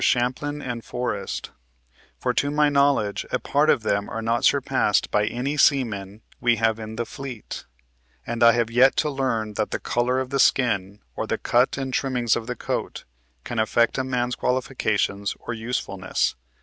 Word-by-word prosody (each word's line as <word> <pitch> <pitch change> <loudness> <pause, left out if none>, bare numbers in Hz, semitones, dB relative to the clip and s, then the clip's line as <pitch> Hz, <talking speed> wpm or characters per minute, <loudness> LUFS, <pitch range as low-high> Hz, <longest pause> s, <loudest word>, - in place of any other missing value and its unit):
Champlin 130 +4 0
and 120 -2 -4
Forrest; 125 0 -4 0.7
for - - -1
to 140 - +1
my 150 0 +3
knowledge 140 -8 +2
a - - +2
part 145 +2 +1
of 115 - +3
them 100 -1 0
are 115 +2 -4
not 115 +3 0
surpassed 135 -7 +2
by 105 0 +2
any 135 +5 -2
seamen 110 -8 +1 0.2
we 120 -1 +3
have 115 0 +1
in 110 0 -7
the 120 +1 -2
fleet; 125 -2 -7 0.6
and 120 0 -4
I 115 0 +8
have 115 -1 0
yet 130 +3 +5
to 150 - +1
learn 115 -6 -1
that - - 0
the - - -3
color 125 +2 0
of 130 0 -4
the 140 - 0
skin, 105 -7 +2
or - - -3
the - - -1
cut 125 +3 +2
and 135 -1 -3
trimmings 125 -4 +1
of 115 - -4
the 125 - -3
coat, - - -4 0.4
can 120 - -3
affect 115 +3 +2
a - - +1
man's 125 -1 -1
qualifications 110 -5 -1
or 120 - -5
usefulness. 110 -5 -2
120 Hz, 175 wpm, -24 LUFS, 110-130 Hz, 0.7 s, I